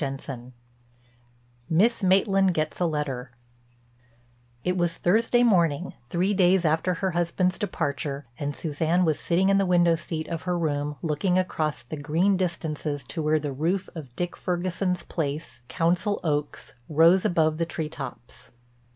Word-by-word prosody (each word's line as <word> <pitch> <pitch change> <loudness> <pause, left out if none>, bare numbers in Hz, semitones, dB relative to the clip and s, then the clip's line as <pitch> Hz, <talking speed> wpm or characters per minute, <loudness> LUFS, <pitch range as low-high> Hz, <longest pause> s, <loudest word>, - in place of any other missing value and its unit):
CHAPTER 135 0 -4
II—MISS 120 - -4
MAITLAND 195 -1 +3
GETS 155 0 -2
A 175 - +2
LETTER 140 -5 -3 1.3
It 180 - 0
was 175 -2 0
Thursday 230 +6 +3
morning, 175 -7 +2 0.2
three 185 +6 +1
days 185 -2 +3
after 160 +4 +1
her 190 +2 -1
husband's 175 +2 0
departure, 145 - -3
and 145 -1 -3
Suzanne 165 +3 0
was 155 -2 +1
sitting 185 +3 +2
in 195 0 +4
the 195 - +2
window 175 -2 +4
seat 160 -1 -5
of 165 -1 -4
her 180 -1 -1
room 150 -3 -1
looking 175 +4 +1
across 155 -7 -1
the 155 +6 -7
green 165 +7 +2
distances 160 -5 -2
to 165 - -3
where 155 0 +2
the 145 -2 -3
roof 175 +7 -1
of 140 -7 -9
Dick 175 0 -3
Ferguson's 180 0 -1
place, 145 -6 -4
Council 180 - 0
Oaks, 150 -2 -2 0.2
rose 165 +4 +5
above 160 -2 +2
the 165 - 0
tree 160 -1 -3
tops. 130 -4 -9
165 Hz, 150 wpm, -26 LUFS, 145-180 Hz, 1.3 s, rose